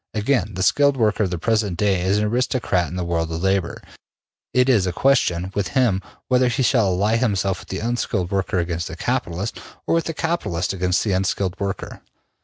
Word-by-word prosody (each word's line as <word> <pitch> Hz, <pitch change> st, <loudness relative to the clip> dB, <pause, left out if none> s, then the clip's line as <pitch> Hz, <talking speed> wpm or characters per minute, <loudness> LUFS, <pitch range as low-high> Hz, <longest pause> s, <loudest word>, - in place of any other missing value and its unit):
Again: 105 Hz, -3 st, 0 dB
the 95 Hz, -, -1 dB
skilled 140 Hz, +7 st, +3 dB
worker 110 Hz, -2 st, +2 dB
of -, -, -2 dB
the 90 Hz, -, -3 dB
present 105 Hz, -1 st, 0 dB
day 100 Hz, -3 st, +1 dB
is 95 Hz, +3 st, +1 dB
an 105 Hz, -, +1 dB
aristocrat 115 Hz, -5 st, 0 dB
in 90 Hz, -, -7 dB
the 90 Hz, -, -2 dB
world 85 Hz, -1 st, -1 dB
of 80 Hz, +2 st, -4 dB
labor. 95 Hz, -2 st, 0 dB, 0.7 s
It 125 Hz, 0 st, +3 dB
is 110 Hz, -8 st, +3 dB
a -, -, 0 dB
question 95 Hz, -6 st, +1 dB
with 100 Hz, -3 st, -1 dB
him 110 Hz, -7 st, +3 dB, 0.3 s
whether 125 Hz, 0 st, +3 dB
he 130 Hz, +2 st, 0 dB
shall 115 Hz, -5 st, +3 dB
ally 100 Hz, +5 st, +1 dB
himself 100 Hz, -5 st, 0 dB
with -, -, -13 dB
the 95 Hz, -, -4 dB
unskilled 110 Hz, -6 st, -1 dB
worker 95 Hz, 0 st, 0 dB
against 85 Hz, -1 st, -2 dB
the -, -, -7 dB
capitalist, 90 Hz, +6 st, -3 dB, 0.2 s
or -, -, 0 dB
with 165 Hz, 0 st, +1 dB
the 165 Hz, -, -4 dB
capitalist 100 Hz, -, -1 dB
against 90 Hz, -1 st, 0 dB
the 105 Hz, -, -1 dB
unskilled 95 Hz, 0 st, -1 dB
worker. 100 Hz, -1 st, -4 dB
100 Hz, 205 wpm, -22 LUFS, 90-120 Hz, 0.7 s, skilled